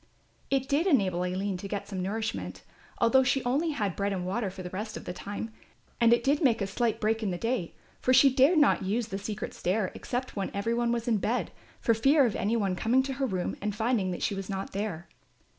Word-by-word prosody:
It 270 -1 +1
did 295 +7 +2
enable 190 - +2
Aline 185 +1 -2
to 200 - -6
get 200 0 -4
some 190 -3 -4
nourishment, 215 +4 -3 0.3
although 245 +3 +5
she 260 +1 +1
only 275 +7 +1
had 210 - -1
bread 200 0 -1
and 185 -2 -2
water 200 +3 -1
for 185 0 -8
the 180 - -5
rest 215 +3 -5
of - - -10
the - - -4
time, 205 +4 -6 0.5
and 235 -1 +5
it 235 0 +4
did 285 +4 +2
make 235 -5 +4
a 200 - 0
slight 230 +3 -1
break 220 +1 +1
in 210 - -1
the 175 - -2
day, 230 -4 -2 0.2
for 255 - +1
she 265 +1 +6
dared 275 +7 +5
not 295 -8 +4
use 215 +4 -1
the 195 - -3
secret 210 +1 -5
stair 190 +1 -1
except 255 +1 -4
when 200 -2 -2
every 215 +4 0
one 235 0 +1
was 235 0 -2
in 230 -3 +3
bed, 230 +5 -1 0.3
for 230 - +3
fear 275 +6 +4
of 225 - -1
any 215 +3 0
one 195 -4 0
coming 245 +7 +2
to 270 0 -3
her 270 0 -1
room 185 -5 -2
and 210 0 -2
finding 220 -3 +1
that 180 - -4
she - - +1
was 195 0 -5
not 195 -1 -4
there. 195 -4 -4
220 Hz, 240 wpm, -28 LUFS, 195-250 Hz, 0.5 s, she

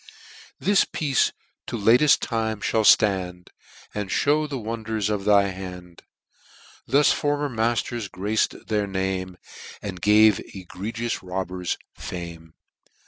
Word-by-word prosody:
This 200 0 +3
piece 140 -5 0 0.4
to - - -3
lateft 120 +8 +5
time 110 -2 -1 0.2
mall 110 - +3
ftand, 95 -4 +3 0.4
And 105 -2 -4 0.2
mew 150 +1 +2
the 140 -2 -4
wonders 110 -2 -3
of 100 -2 -2
thy 100 -1 +4
hand. 90 -2 -9 0.9
Thus 145 +2 +4
former 145 0 0
matters 115 -1 -1
grac'd 105 +4 -2
their 105 -2 0
name. 95 -1 -3 0.4
And 95 -4 -7
gave 105 0 +5 0.2
egregious 110 +6 -4
robbers 90 -1 -3 0.2
fame. 85 -2 -8
105 Hz, 115 wpm, -24 LUFS, 95-115 Hz, 0.9 s, lateft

